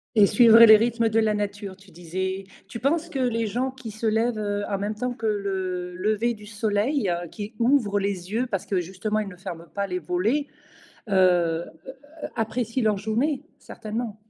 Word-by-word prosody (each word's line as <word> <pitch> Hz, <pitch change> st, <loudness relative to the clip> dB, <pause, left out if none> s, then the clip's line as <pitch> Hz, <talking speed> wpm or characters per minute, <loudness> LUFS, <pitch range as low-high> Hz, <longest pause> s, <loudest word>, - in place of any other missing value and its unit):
Et 210 Hz, -2 st, +7 dB
suivre 225 Hz, +3 st, +6 dB
les 225 Hz, -2 st, +10 dB
rythmes 230 Hz, +1 st, +2 dB
de 220 Hz, +1 st, +2 dB
la 215 Hz, -1 st, +2 dB
nature, 205 Hz, -2 st, -4 dB
tu 195 Hz, 0 st, -19 dB
disais. 185 Hz, +3 st, -4 dB, 0.2 s
Tu 230 Hz, -, -7 dB
penses 315 Hz, +7 st, 0 dB
que 275 Hz, -, -4 dB
les 230 Hz, -3 st, 0 dB
gens 245 Hz, +5 st, -1 dB
qui 260 Hz, -4 st, -9 dB
se 220 Hz, +2 st, -3 dB
lèvent, 225 Hz, +1 st, +1 dB
heu, 205 Hz, -1 st, -2 dB
en 200 Hz, -, -1 dB
même 210 Hz, +2 st, -2 dB
temps 250 Hz, +3 st, -2 dB
que 225 Hz, -2 st, -4 dB
le 190 Hz, -3 st, -2 dB
lever 215 Hz, +5 st, 0 dB
du 210 Hz, -2 st, -12 dB
soleil, 210 Hz, +2 st, 0 dB
heu, 175 Hz, 0 st, -3 dB
qui 210 Hz, +5 st, -7 dB
ouvrent 230 Hz, -5 st, +2 dB
les 195 Hz, -2 st, -3 dB
yeux 240 Hz, +4 st, 0 dB
parce 195 Hz, -6 st, -3 dB
que 185 Hz, -3 st, 0 dB
justement 195 Hz, +5 st, -3 dB
ils 210 Hz, -, -3 dB
ne 190 Hz, -, -9 dB
ferment 175 Hz, -2 st, -8 dB
pas 200 Hz, 0 st, 0 dB
les 180 Hz, -2 st, -3 dB
volets, 195 Hz, -, 0 dB, 0.6 s
heu, 175 Hz, -3 st, +3 dB, 0.3 s
heu, -, -, -7 dB, 0.4 s
apprécient 230 Hz, +2 st, -1 dB
leur 210 Hz, -1 st, +2 dB
journée? 240 Hz, +8 st, -1 dB, 0.2 s
Certainement. 220 Hz, -1 st, -6 dB
210 Hz, 195 wpm, -25 LUFS, 190-230 Hz, 0.6 s, les